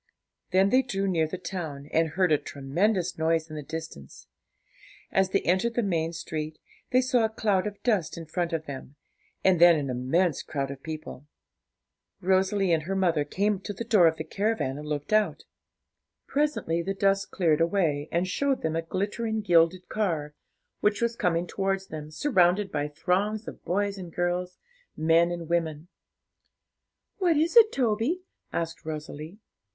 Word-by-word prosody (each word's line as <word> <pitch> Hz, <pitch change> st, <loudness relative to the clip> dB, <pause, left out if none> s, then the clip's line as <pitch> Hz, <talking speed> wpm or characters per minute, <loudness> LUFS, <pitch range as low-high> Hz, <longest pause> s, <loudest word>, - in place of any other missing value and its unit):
Then 190 Hz, +2 st, +3 dB
they 255 Hz, -, +5 dB
drew 195 Hz, -6 st, -2 dB
near 165 Hz, -4 st, +1 dB
the 185 Hz, -, -5 dB
town, 160 Hz, -7 st, -6 dB
and 165 Hz, 0 st, +3 dB
heard 180 Hz, +2 st, +1 dB
a 150 Hz, -, +4 dB
tremendous 175 Hz, +7 st, -1 dB
noise 160 Hz, 0 st, +1 dB
in -, -, -6 dB
the 150 Hz, -, -4 dB
distance. 160 Hz, -, -8 dB, 0.9 s
As 190 Hz, -1 st, +2 dB
they 195 Hz, -, +1 dB
entered 190 Hz, +7 st, +1 dB
the 240 Hz, -, +1 dB
main 165 Hz, -4 st, 0 dB
street, 155 Hz, -1 st, -5 dB, 0.3 s
they 255 Hz, 0 st, +4 dB
saw 250 Hz, -2 st, +2 dB
a 220 Hz, -, +2 dB
cloud 210 Hz, -3 st, 0 dB
of 205 Hz, -1 st, -8 dB
dust 210 Hz, -11 st, +1 dB
in 165 Hz, -, -7 dB
front 170 Hz, +2 st, -2 dB
of 160 Hz, -1 st, -2 dB
them, 140 Hz, -1 st, -8 dB, 0.5 s
and 185 Hz, -3 st, +4 dB
then 175 Hz, -1 st, +9 dB
an 140 Hz, -4 st, -2 dB
immense 140 Hz, +6 st, +1 dB
crowd 140 Hz, -2 st, -3 dB
of 135 Hz, -1 st, -9 dB
people. 155 Hz, -3 st, -7 dB, 0.9 s
Rosalie 190 Hz, 0 st, +2 dB
and 160 Hz, -, +2 dB
her 195 Hz, -, 0 dB
mother 170 Hz, -6 st, +2 dB
came 200 Hz, +6 st, 0 dB
to 205 Hz, -, -6 dB
the 215 Hz, -, -5 dB
door 215 Hz, -7 st, +5 dB
of 160 Hz, 0 st, +1 dB
the -, -, -4 dB
caravan 200 Hz, -10 st, -1 dB
and 150 Hz, -, -8 dB
looked 150 Hz, +5 st, -3 dB
out. 215 Hz, -1 st, +2 dB, 0.8 s
Presently 285 Hz, -, 0 dB
the 195 Hz, +3 st, -3 dB
dust 195 Hz, 0 st, +1 dB
cleared 165 Hz, -4 st, +2 dB
away, 165 Hz, -5 st, +1 dB
and 175 Hz, +2 st, +1 dB
showed 275 Hz, +7 st, 0 dB
them 160 Hz, 0 st, 0 dB
a 165 Hz, -, 0 dB
glittering 210 Hz, +6 st, -2 dB
gilded 175 Hz, -1 st, +3 dB
car, 160 Hz, -9 st, -1 dB, 0.5 s
which 210 Hz, 0 st, +1 dB
was 235 Hz, 0 st, 0 dB
coming 175 Hz, -4 st, +1 dB
towards 195 Hz, +1 st, -2 dB
them, 155 Hz, -1 st, -7 dB
surrounded 190 Hz, -, +2 dB
by 145 Hz, -1 st, -1 dB
throngs 195 Hz, +8 st, -1 dB
of -, -, -9 dB
boys 200 Hz, +2 st, -1 dB
and 175 Hz, -2 st, -8 dB
girls, 180 Hz, +1 st, -1 dB, 0.4 s
men 165 Hz, +2 st, +4 dB
and 170 Hz, -1 st, -5 dB
women. 165 Hz, -1 st, -1 dB, 1.3 s
'What 350 Hz, -5 st, +3 dB
is 325 Hz, +6 st, +1 dB
it, 450 Hz, -2 st, +8 dB
Toby?' 250 Hz, +8 st, 0 dB, 0.3 s
asked 165 Hz, 0 st, -3 dB
Rosalie. 155 Hz, +2 st, -6 dB
180 Hz, 170 wpm, -27 LUFS, 160-205 Hz, 1.3 s, then